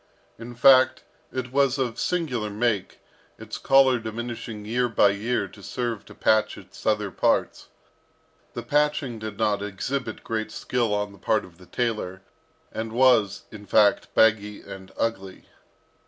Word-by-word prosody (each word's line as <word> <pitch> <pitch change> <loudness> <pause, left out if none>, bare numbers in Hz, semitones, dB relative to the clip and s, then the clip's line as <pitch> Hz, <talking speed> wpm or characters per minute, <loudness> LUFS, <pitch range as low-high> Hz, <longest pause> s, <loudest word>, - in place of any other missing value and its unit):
In 120 +1 -9
fact, 130 0 +5 0.3
it 125 -1 -4
was 140 0 +2
of 125 -4 -2
singular 130 -12 -1
make, 105 -1 -1 0.4
its - - -8
collar 135 -2 +4
diminishing 115 -1 -6
year 120 +3 0
by 105 -2 +4
year 105 +1 -1
to 100 - -15
serve 120 0 -4
to - - -14
patch 110 0 +2
its - - -11
other 105 -2 +1
parts. - - 0 0.9
The - - -4
patching 145 -5 0
did 110 -2 -6
not 105 -2 +1
exhibit 110 +4 -4
great 110 -1 -3
skill 120 -3 -1
on 105 0 -1
the 100 - -16
part 110 - +1
of 90 -1 -18
the 90 - -16
tailor, 105 -6 -3 0.5
and 110 0 -5
was, 120 -4 +3
in 105 -2 -11
fact, 100 +1 +3
baggy 105 -2 +2
and 95 -1 -10
ugly. 95 -5 -3
110 Hz, 150 wpm, -25 LUFS, 105-125 Hz, 0.9 s, fact